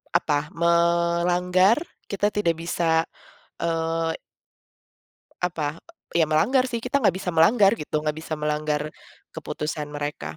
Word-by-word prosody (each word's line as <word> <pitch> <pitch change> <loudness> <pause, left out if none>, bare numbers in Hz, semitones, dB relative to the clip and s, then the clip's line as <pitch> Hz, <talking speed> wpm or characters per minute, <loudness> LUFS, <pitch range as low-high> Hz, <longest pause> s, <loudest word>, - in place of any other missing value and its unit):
apa, 150 -3 +1
melanggar, 170 +3 +3 0.3
kita 200 +1 0
tidak 170 -6 +1
bisa, 165 -1 +1 0.6
eee 165 0 -1 1.3
Apa, 165 -3 -2 0.3
eee, 170 - +2
ya - - +6
melanggar 255 - +3
sih, 235 -2 -4
kita 280 +3 +1
gak 195 -7 +3
bisa 185 -1 -3
melanggar 195 +5 +5
gitu, 150 - -3
gak 150 0 -1
bisa 160 -1 -4
melanggar 150 0 -2 0.4
keputusan 150 0 -4
mereka. 145 - -5
165 Hz, 120 wpm, -24 LUFS, 155-180 Hz, 1.3 s, ya